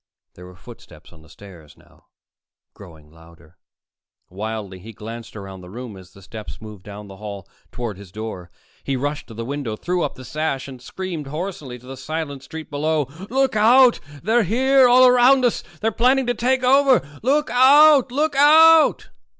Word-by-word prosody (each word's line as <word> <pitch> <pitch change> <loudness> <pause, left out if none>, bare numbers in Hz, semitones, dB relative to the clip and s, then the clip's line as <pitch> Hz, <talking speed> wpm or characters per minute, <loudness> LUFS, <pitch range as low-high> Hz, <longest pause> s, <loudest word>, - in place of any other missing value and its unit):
There 90 0 -14
were 90 - -15
footsteps 90 - -16
on 80 - -18
the 80 - -20
stairs 85 -5 -16
now, - - -25 0.7
growing 80 -6 -16
louder. 80 0 -20 0.7
Wildly 105 -1 -6
he 110 +5 -12
glanced 115 +3 -10
around 95 -2 -10
the 90 - -13
room 120 +1 -9
as 95 -1 -15
the 100 - -17
steps 110 +3 -10
moved 105 -3 -11
down 105 +1 -11
the 95 -1 -13
hall 100 -3 -9 0.2
toward 115 -6 -6
his 100 -3 -14
door. 105 -4 -8 0.3
He 135 - -2
rushed 145 +3 -4
to 115 - -12
the 115 +1 -6
window, 135 -4 -5
threw 180 +9 -3
up - - -3
the 130 - -12
sash 150 0 -3
and 130 -3 -11
screamed 170 +1 -7
hoarsely 150 -4 -6
to 125 - -19
the 135 +1 -9
silent 145 0 -6
street 155 +4 -10
below: 150 -1 -1 0.2
"Look 265 0 0
out! 240 +4 +5 0.2
They're 225 +5 +2
here, 260 +6 +3
all 250 +1 +6
around 250 +1 +5
us! 240 - -1 0.2
They're 225 - 0
planning 255 +4 +2
to 245 - 0
take 255 +2 -1
over! 265 - +3
Look 290 +5 0
out! 275 +1 +5
Look 295 +2 -1
out!" 315 +3 +5
140 Hz, 180 wpm, -21 LUFS, -, 0.7 s, all